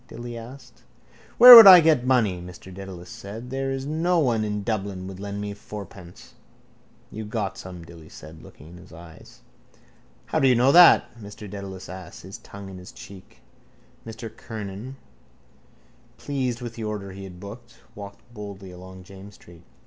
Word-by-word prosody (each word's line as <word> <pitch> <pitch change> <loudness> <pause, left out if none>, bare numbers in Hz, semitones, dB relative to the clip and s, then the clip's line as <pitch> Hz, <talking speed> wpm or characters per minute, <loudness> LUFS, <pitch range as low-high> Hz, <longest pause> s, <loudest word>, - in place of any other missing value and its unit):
Dilly 120 0 -9
asked. 125 +2 -13 0.6
—Where 245 +1 +12
would 225 -3 +11
I 185 -2 +11
get 155 -6 +2
money? 110 -9 +1
Mr 90 +1 -12
Dedalus 95 -2 -10
said. 110 +5 -10
There 135 0 -3
is 135 0 -4
no 165 +4 -1
one 120 -8 0
in 105 -1 -4
Dublin 100 -4 -4
would 95 0 -9
lend 100 0 -6
me 105 0 -5
fourpence. 100 -3 -12 0.8
—You 110 - -7
got 105 -3 -4
some, 90 -2 -11
Dilly 80 -2 -15
said, 80 +2 -13
looking 75 - -16
in 90 - -14
his 90 - -17
eyes. 80 -1 -15 0.8
—How - - -2
do 135 - +3
you 125 - +4
know 125 +3 +3
that? 175 -4 +6
Mr 105 0 -11
Dedalus 95 -1 -9
asked, 95 0 -11
his 95 +2 -11
tongue 100 0 -12
in 95 - -11
his 90 - -13
cheek. 95 -1 -15 0.6
Mr 110 0 -10
Kernan, 110 +3 -9 1.2
pleased 130 -4 -4
with 120 -2 -7
the 115 - -8
order 105 -2 -6
he 95 +1 -10
had 90 -2 -12
booked, 110 +5 -12 0.2
walked 100 -1 -11
boldly 100 -3 -10
along 95 +1 -13
James's 95 +1 -14
street. 85 -1 -18
100 Hz, 170 wpm, -23 LUFS, 95-120 Hz, 1.2 s, Where